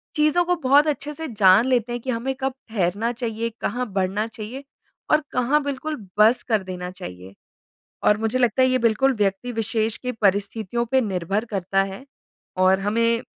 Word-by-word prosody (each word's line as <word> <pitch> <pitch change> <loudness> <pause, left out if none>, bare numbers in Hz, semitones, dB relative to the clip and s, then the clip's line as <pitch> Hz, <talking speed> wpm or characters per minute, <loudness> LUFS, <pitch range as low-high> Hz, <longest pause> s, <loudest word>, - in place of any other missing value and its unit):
चीज़ों 305 +3 +3
को 355 0 +2
बहुत 290 0 +4
अच्छे 295 0 -2
से 320 +1 -6
जान 205 -2 +5
लेते 245 -2 +1
हैं 240 0 -3
कि 260 - -6
हमें 250 +2 -1
कब 265 0 -1 0.2
ठहरना 210 +2 0
चाहिए, 230 -1 -3
कहाँ 245 +1 -2
बढ़ना 195 +3 0
चाहिए 230 +4 -8 0.5
और 305 - +5
कहाँ 270 +5 +2
बिल्कुल 285 +2 -3 0.2
बस 225 +4 +5
कर 220 -5 +1
देना 180 -1 -6
चाहिए। 95 - -10 0.7
और 210 - +5
मुझे 225 +3 -1
लगता 245 0 +2
है 260 - +5
ये 255 - +2
बिल्कुल 235 +3 +3
व्यक्ति 205 +4 0
विशेष 225 -1 -1
के 250 0 -4
परिस्थितियों 210 +2 0
पे 260 +3 +2
निर्भर 195 0 -2
करता 195 -3 0
है 195 +7 -8 0.6
और 190 +1 +4
हमें 230 +4 +1
230 Hz, 175 wpm, -23 LUFS, 200-255 Hz, 0.7 s, जान